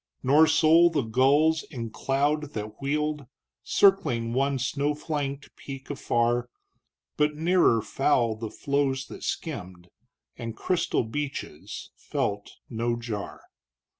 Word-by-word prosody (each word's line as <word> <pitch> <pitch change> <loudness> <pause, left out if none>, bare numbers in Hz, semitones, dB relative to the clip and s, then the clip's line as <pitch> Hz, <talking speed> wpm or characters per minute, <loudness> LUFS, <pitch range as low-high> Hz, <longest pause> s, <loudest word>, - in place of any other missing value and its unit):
Nor 150 +5 +6
sole 160 +2 +5
the 155 -5 0
gulls 140 +7 +3
in 115 -6 -6
cloud 145 +5 0
that 105 +2 -6
wheeled 150 0 -1 0.3
Circling 120 - +3
one 135 +2 +1
snow 140 +3 -1
flanked 145 -2 -4
peak 135 0 -8
afar, 120 -2 0 0.7
But 150 0 +2
nearer 160 - +3
fowl 120 -5 +1
the 110 0 -5
floes 140 -1 -1
that - - -9
skimmed 90 - -5 0.5
And 115 -2 -6
crystal 180 -8 0
beaches, 135 - -6
felt 100 0 -3
no 115 0 -1
jar. 115 -4 -6
135 Hz, 115 wpm, -27 LUFS, 115-150 Hz, 0.7 s, Nor